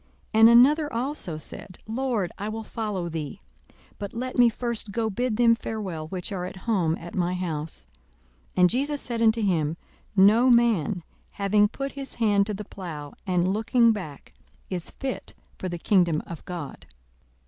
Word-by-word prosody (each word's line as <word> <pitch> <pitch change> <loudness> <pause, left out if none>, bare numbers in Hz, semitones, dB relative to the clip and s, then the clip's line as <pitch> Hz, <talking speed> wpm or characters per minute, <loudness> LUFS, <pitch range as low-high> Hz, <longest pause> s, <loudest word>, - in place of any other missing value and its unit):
42:009:061 220 - +3
And 225 +1 +9
another 290 +6 +5
also 235 - -3
said, 180 +4 -8
Lord, 225 -5 -1
I 205 +2 -3
will 220 +1 -4
follow 210 -6 -3
thee; 155 -4 -5 0.6
but 200 +2 -6
let 255 +2 -4
me 245 -2 +6
first 230 -2 -4
go 220 +1 -1
bid 240 +1 -1
them 235 -1 +6
farewell, 195 -9 -4
which 180 +2 -4
are 185 -3 -3
at - - -7
home 180 -8 +2
at 170 +1 -10
my 180 0 0
house. 165 -4 -4 0.7
42:009:062 185 - +2
And 180 - +7
Jesus 285 +4 0
said 235 -2 -2
unto 225 0 +4
him, 165 -5 +1 0.4
No 215 +6 +6
man, 220 -7 +3 0.3
having 205 +1 +3
put 275 +5 -5
his 275 -1 -5
hand 205 -3 +3
to 210 - -2
the 210 +1 -7
plough, 155 -8 -7
and 180 0 +2
looking 230 +2 +4
back, 180 -10 -6 0.4
is 180 -2 -2
fit 265 -1 -5 0.2
for 185 - -3
the 175 - -4
kingdom 170 -3 +2
of 170 -3 -8
God. 145 - -7
205 Hz, 170 wpm, -26 LUFS, 175-235 Hz, 0.7 s, And